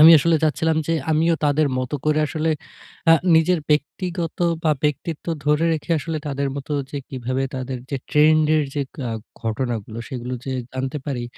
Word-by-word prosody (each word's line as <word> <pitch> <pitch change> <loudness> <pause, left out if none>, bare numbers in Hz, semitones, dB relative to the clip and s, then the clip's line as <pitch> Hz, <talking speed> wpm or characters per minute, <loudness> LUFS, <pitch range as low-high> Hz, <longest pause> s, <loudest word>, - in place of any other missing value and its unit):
আমি 160 - +11
আসলে 165 +2 +3
চাচ্ছিলাম 160 +1 +2
যে 165 - +1 0.2
আমিও 165 +2 +3
তাদের 145 0 +3
মতো 130 +3 -2
করে 155 0 +3
আসলে 160 +1 -1 0.6
আ - - +10 0.2
নিজের 160 +2 +4
ব্যক্তিগত 170 +3 -1 0.3
বা 155 - +4
ব্যক্তিত্ব 150 +3 -2 0.2
ধরে 150 +2 +3
রেখে 160 +2 -4
আসলে 160 +1 -3
তাদের 140 -1 -1
মতো 140 +2 -5 0.2
যে 145 - -3
কিভাবে 130 0 -2
তাদের 130 0 -4
যে 140 - 0
ট্রেন্ড 155 +1 +5
এর 150 - +2
যে 145 - 0 0.3
আ - - -3 0.3
ঘটনাগুলো 115 -1 -2
সেগুলো 125 0 -4
যে 135 - -3 0.2
জানতে 130 +3 -3
পারি, 125 -4 -2
150 Hz, 170 wpm, -22 LUFS, 130-160 Hz, 0.6 s, আমি